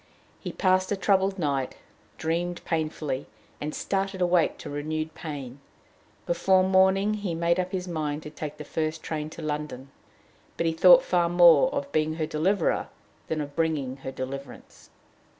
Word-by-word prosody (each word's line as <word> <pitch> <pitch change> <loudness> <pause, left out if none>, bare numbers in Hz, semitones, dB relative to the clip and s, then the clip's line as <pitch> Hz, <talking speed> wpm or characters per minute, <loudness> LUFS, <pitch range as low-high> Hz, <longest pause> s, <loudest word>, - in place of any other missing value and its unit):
He - - -5
passed 185 0 +2
a - - +2
troubled 195 0 +2
night, 140 -6 -1 0.4
dreamed 175 +2 -2
painfully, 155 -4 -2 0.3
and 150 +1 -4
started 195 -1 -2
awake 175 -2 +2
to - - -8
renewed 155 +2 -3
pain. 140 -5 -7 0.7
Before 185 +2 +3
morning 190 +2 +3
he 205 -2 -3
had 165 - -2
made 170 +1 +2
up 185 0 -2
his 185 -1 -3
mind 155 -3 -3
to 150 - -8
take 150 -1 -6
the - - -7
first 155 0 -3
train 155 -1 -4
to 160 - -9
London. 150 -3 -4 0.7
But 170 - 0
he 165 - +1
thought - - +7
far 175 -1 +2
more 170 -4 +6
of 140 0 -3
being 155 +1 +1
her 160 -1 -1
deliverer 165 +4 0 0.4
than 160 -1 -1
of 145 -1 -7
bringing 150 -6 -1
her 135 -1 -6
deliverance. 135 +1 -8
160 Hz, 165 wpm, -26 LUFS, 150-185 Hz, 0.7 s, thought